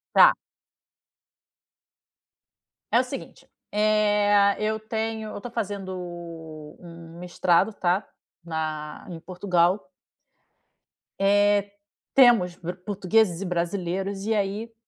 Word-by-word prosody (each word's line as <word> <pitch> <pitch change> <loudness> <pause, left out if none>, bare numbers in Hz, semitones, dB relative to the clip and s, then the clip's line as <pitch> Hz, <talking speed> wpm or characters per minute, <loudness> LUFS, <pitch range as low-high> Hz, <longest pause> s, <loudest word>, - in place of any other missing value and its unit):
Tá. - - +8 2.6
É - - +5
o - - 0
seguinte: - - -9 0.2
eh, 205 -1 +3
eu 220 0 0
tenho 220 0 -4
Eu - - -7
tô 245 - -7
fazendo 200 -4 -4 0.8
um 170 -1 -12
mestrado, 180 +3 +1
tá. 185 0 0 0.4
Na 155 -1 -5
em 170 - -6
Portugal. 180 +2 0 1.3
Eh, 205 0 +3 0.4
temos 235 -10 +5
bro 175 +1 -6
portugueses 200 -2 +1
e - - -3
brasileiros 185 +2 -2
e 225 - +1
aí 210 +3 -2
200 Hz, 95 wpm, -25 LUFS, 175-215 Hz, 2.6 s, Tá